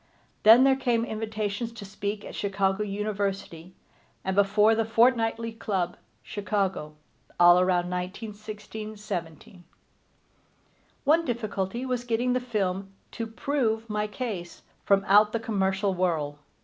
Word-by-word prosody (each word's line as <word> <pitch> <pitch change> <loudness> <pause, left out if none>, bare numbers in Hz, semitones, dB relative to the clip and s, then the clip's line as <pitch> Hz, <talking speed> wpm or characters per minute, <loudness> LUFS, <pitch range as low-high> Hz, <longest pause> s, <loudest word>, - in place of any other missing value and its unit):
Then 225 +4 +8
there 270 0 +5
came 240 -3 +1
invitations 220 0 -3
to 220 -3 -9
speak 205 +1 -4
at - - -8
Chicago 195 0 0
University, 195 -4 -3 0.5
and 190 0 -1
before 210 +2 +4
the 225 0 +1
Fortnightly 230 0 +2
Club, 190 -5 -2 0.3
Chicago, 195 -7 -2 0.4
all 175 0 +8
around 180 -1 +2
1916 210 +3 -6
17. 180 -3 -6 1.4
One 315 +4 +4
difficulty 230 - -3
was 250 -2 -2
getting 245 +1 0
the 255 - +2
film 195 -6 -2 0.2
to 230 - -4
prove 225 -2 -1
my 210 0 0
case 210 -7 -6 0.2
from 195 -1 +3
out 210 +2 +5
the 230 - 0
commercial 195 -3 0
whirl. 160 -5 -1
210 Hz, 125 wpm, -27 LUFS, 190-225 Hz, 1.4 s, Then